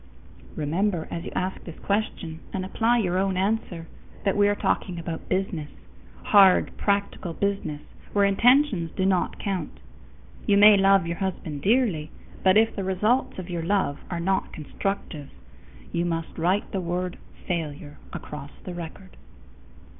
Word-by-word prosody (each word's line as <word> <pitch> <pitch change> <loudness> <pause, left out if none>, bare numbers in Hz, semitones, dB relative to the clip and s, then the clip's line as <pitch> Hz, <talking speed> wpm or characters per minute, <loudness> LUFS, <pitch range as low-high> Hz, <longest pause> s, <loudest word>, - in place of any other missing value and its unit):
_ - - -18
Remember, 165 +3 0
as 170 - -4
you - - -6
ask 185 +1 -2
this 170 - -9
question 200 -6 -2
and 185 -1 -3
apply 230 +5 +2
your 185 -5 +1
own 190 -1 0
answer, 190 -4 -1 0.4
that 195 - +1
we 205 0 +4
are 205 - +2
talking 180 -3 -1
about 165 -1 -6
business; 185 -5 -1 0.5
hard, 195 -3 +5
practical 200 -4 -1
business 195 -7 -2 0.3
where 200 -1 +3
intentions 230 - +4
do 185 - 0
not 190 -2 +1
count. 190 -6 -4 0.7
You 200 - +5
may 210 +1 +9
love 195 -1 +4
your 170 0 -3
husband 165 -6 -4
dearly, 200 - +2 0.3
but 190 +1 +5
if 225 +1 +3
the 195 - -3
results 210 +7 +1
of 185 -1 -6
your 170 -1 -2
love 170 -5 0
are 175 - -3
not 190 +3 0
constructive, 155 -2 -4 0.6
you 170 - 0
must 165 -1 -3
write 180 +5 0
the 190 - -2
word 180 +1 -3 0.3
FAILURE 150 -4 -4
across 145 -1 -7
the 180 - -6
record. 175 +3 -9
185 Hz, 155 wpm, -25 LUFS, 170-200 Hz, 0.7 s, may